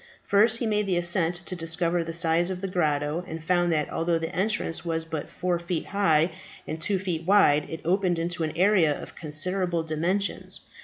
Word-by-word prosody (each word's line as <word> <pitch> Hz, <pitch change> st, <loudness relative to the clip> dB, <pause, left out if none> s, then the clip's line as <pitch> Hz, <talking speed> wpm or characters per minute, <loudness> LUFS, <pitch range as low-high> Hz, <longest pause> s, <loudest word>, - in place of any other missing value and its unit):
First 215 Hz, +3 st, +4 dB
he 235 Hz, -, -2 dB
made 210 Hz, -2 st, 0 dB
the 180 Hz, -2 st, +1 dB
ascent 175 Hz, 0 st, +1 dB
to 185 Hz, -, -3 dB
discover 170 Hz, 0 st, 0 dB
the 165 Hz, -, -5 dB
size 165 Hz, +1 st, +2 dB
of 185 Hz, -1 st, -4 dB
the 195 Hz, -, -2 dB
grotto, 155 Hz, -2 st, 0 dB
and 160 Hz, 0 st, -7 dB
found 175 Hz, 0 st, +2 dB
that 150 Hz, -2 st, 0 dB
although 165 Hz, 0 st, 0 dB
the 165 Hz, +2 st, -4 dB
entrance 190 Hz, -5 st, -1 dB
was 165 Hz, -1 st, -2 dB
but 160 Hz, -2 st, -5 dB
four 180 Hz, -1 st, -1 dB
feet 170 Hz, -1 st, -3 dB
high 170 Hz, -5 st, +2 dB, 0.3 s
and 160 Hz, -, -5 dB
two 200 Hz, +3 st, +1 dB
feet 180 Hz, -4 st, -3 dB
wide, 170 Hz, -6 st, +4 dB
it 160 Hz, -, -6 dB
opened 180 Hz, 0 st, +1 dB
into 170 Hz, +1 st, -2 dB
an 155 Hz, 0 st, -3 dB
area 180 Hz, -6 st, +3 dB
of -, -, -10 dB
considerable 170 Hz, +2 st, -1 dB
dimensions. 170 Hz, +6 st, -1 dB
170 Hz, 195 wpm, -26 LUFS, 160-185 Hz, 0.3 s, First